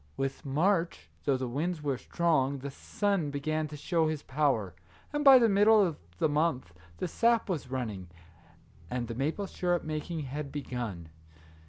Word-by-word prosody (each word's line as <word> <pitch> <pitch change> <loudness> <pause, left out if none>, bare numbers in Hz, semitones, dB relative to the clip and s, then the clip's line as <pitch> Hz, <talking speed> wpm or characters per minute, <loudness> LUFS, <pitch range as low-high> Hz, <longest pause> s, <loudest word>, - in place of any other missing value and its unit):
With 135 +2 -3
March, 165 +5 0
though 140 -2 +2
the 130 0 -3
winds 155 +6 -2
were 140 -2 0
strong, 140 -5 +1
the 140 +1 -6
sun 195 +1 -1
began 155 +2 -2
to 150 0 -8
show 165 +1 +1
his 155 -2 -3
power, 130 - 0 0.4
and 295 0 0
by 270 -2 +10
the 235 -2 +5
middle 210 +2 +5
of 165 -4 -3 0.2
the 155 - +2
month 145 - 0 0.2
the - - -2
sap 230 +5 +2
was 165 -9 -3
running, 110 -9 -4 0.8
and 125 -1 -2
the 115 - -4
maple 150 - -1
sugar 175 -2 0
making 155 +1 -3
had 140 +1 -5
begun. 120 - -5
150 Hz, 165 wpm, -30 LUFS, 130-175 Hz, 0.8 s, by